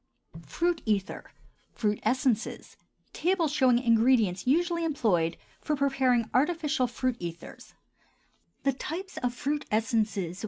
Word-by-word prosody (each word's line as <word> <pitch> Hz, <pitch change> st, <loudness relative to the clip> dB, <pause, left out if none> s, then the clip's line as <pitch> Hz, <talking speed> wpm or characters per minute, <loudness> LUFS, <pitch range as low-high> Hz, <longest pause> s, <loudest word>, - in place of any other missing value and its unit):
FRUIT 345 Hz, -1 st, 0 dB
ETHERS 200 Hz, -3 st, -1 dB, 0.5 s
(FRUIT 210 Hz, -2 st, -1 dB
ESSENCES). 245 Hz, 0 st, -1 dB, 0.4 s
TABLE 355 Hz, -1 st, +1 dB
SHOWING 260 Hz, -4 st, +3 dB
THE 240 Hz, -, 0 dB
INGREDIENTS 225 Hz, -4 st, +3 dB
USUALLY 340 Hz, +4 st, +2 dB
EMPLOYED 210 Hz, -, +1 dB, 0.2 s
FOR 305 Hz, -, -1 dB
PREPARING 265 Hz, -4 st, +1 dB
ARTIFICIAL 300 Hz, -1 st, +1 dB
FRUIT 245 Hz, 0 st, -2 dB
ETHERS 170 Hz, -1 st, -8 dB, 0.9 s
(FRUIT 290 Hz, -1 st, -2 dB
ESSENCES). 215 Hz, -5 st, 0 dB
255 Hz, 95 wpm, -28 LUFS, 220-300 Hz, 0.9 s, SHOWING